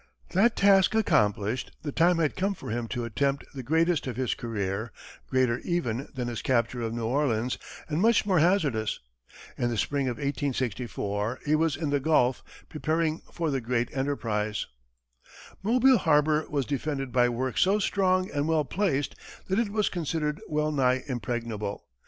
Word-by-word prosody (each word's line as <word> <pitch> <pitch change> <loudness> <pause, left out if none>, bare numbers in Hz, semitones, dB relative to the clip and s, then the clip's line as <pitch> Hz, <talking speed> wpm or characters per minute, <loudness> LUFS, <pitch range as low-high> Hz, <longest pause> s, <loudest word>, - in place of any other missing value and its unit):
That 220 +6 +3
task 195 0 +5
accomplished, 110 - +1
the 145 - -3
time 170 +4 +3
had 155 -3 +1
come 195 +2 0
for 110 - -7
him 120 0 -2
to 120 0 -3
attempt 140 +4 -1
the 135 - -5
greatest 160 +4 +1
of 125 - -3
his 130 -1 0
career 105 -1 -3 0.4
greater, 130 -2 +2
even, 140 -8 -2
than 125 -2 -2
his 120 -2 -4
capture 120 -1 0
of 115 -1 -2
New 115 0 -3
Orleans, 125 -2 0 0.3
and 155 +2 -1
much 230 0 +4
more 190 -4 +3
hazardous. 150 - +1 0.6
In 120 - +1
the 115 - -2
spring 140 +3 0
of 125 - -2
1864, 125 -5 -2
he 150 - +2
was 160 -1 +2
in 155 -3 -2
the 145 - +2
Gulf, 135 -4 +2 0.3
preparing 155 +1 -1
for 165 -3 -1
the 135 -2 -1
great 120 +1 -1
enterprise. 110 -6 -1 1.0
Mobile 250 +5 +4
harbor 150 -1 +3
was 140 -3 0
defended 140 -2 -3
by 120 0 +3
works 125 +1 -1
so 195 +3 +4
strong 185 -2 +1
and 145 0 -1
well 160 -2 +2
placed 145 -2 0 0.4
that 190 +3 +2
it 230 -3 +1
was 210 0 +1
considered 155 -3 -2
well 150 0 0
nigh 130 -3 +2
impregnable. 115 -5 -4
140 Hz, 165 wpm, -27 LUFS, 120-165 Hz, 1.0 s, task